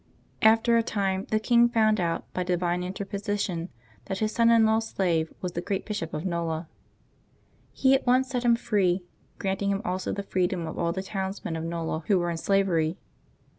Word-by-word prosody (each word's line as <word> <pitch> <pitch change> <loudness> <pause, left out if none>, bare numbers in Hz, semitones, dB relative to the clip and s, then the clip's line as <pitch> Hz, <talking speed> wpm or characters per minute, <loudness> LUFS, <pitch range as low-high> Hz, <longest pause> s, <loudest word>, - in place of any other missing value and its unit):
After 225 +2 +5
a - - +4
time 195 -3 -1
the 215 - +2
king 235 +2 +4
found 215 -2 +3
out, 170 -2 -1
by 185 - -2
divine 180 0 0
interposition, 195 -2 -3 0.4
that 190 - -3
his 215 +2 0
son 230 0 +3
in 230 -1 +6
law's 220 +1 +2
slave 165 -6 0
was 180 - -3
the 170 - -3
great 195 +1 -3
Bishop 205 -7 -4
of 155 - -4
ISTola. 170 -2 -2 1.1
He 265 0 +3
at 265 - +1
once 255 +1 +4
set 250 -2 -2
him 235 -1 +5
free, 195 -6 +1 0.3
granting 195 +1 -1
him 200 +1 -1
also 185 +1 -2
the 200 - -3
freedom 180 -2 -1
of 160 - -6
all 170 -1 +1
the 190 +2 -4
towns 190 0 -4
men 165 - -2
of 165 +1 -3
Kola 165 -2 -2
who 200 - +4
were 175 -1 0
in 165 - -3
slavery. 175 -3 +1
195 Hz, 195 wpm, -27 LUFS, 175-220 Hz, 1.1 s, in